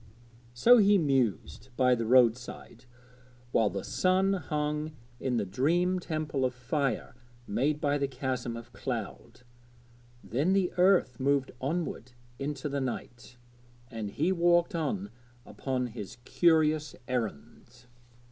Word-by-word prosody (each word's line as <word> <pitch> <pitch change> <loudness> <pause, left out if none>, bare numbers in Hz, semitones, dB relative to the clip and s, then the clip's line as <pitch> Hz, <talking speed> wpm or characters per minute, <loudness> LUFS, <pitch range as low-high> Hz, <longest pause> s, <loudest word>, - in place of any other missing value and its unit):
So 240 - +7
he 205 0 +5
mused 130 - 0
by 125 -1 +4
the 115 -2 -1
road 120 -2 +6
side 125 -1 -11 0.7
while 110 -3 +3
the 100 -1 -5
sun 190 +1 +2
hung 150 -3 -2 0.3
in 130 -2 -1
the 105 - 0
dream 170 - +1
temple 155 -5 -3
of 125 -1 0
fire 135 +2 -2 0.3
made 140 +9 0
by 145 -1 +1
the 140 - 0
chasm 130 -3 -3
of 115 - -11
cloud. - - -6 0.8
Then 135 - 0
the 190 -2 +1
earth 180 -9 +3
moved 140 0 +1
onward 140 -4 -3 0.3
into 140 0 -3
the 140 -1 -2
night, 120 -1 -6 0.5
and 110 -3 -4
he 155 - 0
walked 175 +1 +3
on 120 - -2 0.3
upon 130 -2 -3
his 115 -3 -8
curious 155 -3 +2
errand. 120 - -5
135 Hz, 130 wpm, -29 LUFS, 120-160 Hz, 0.8 s, So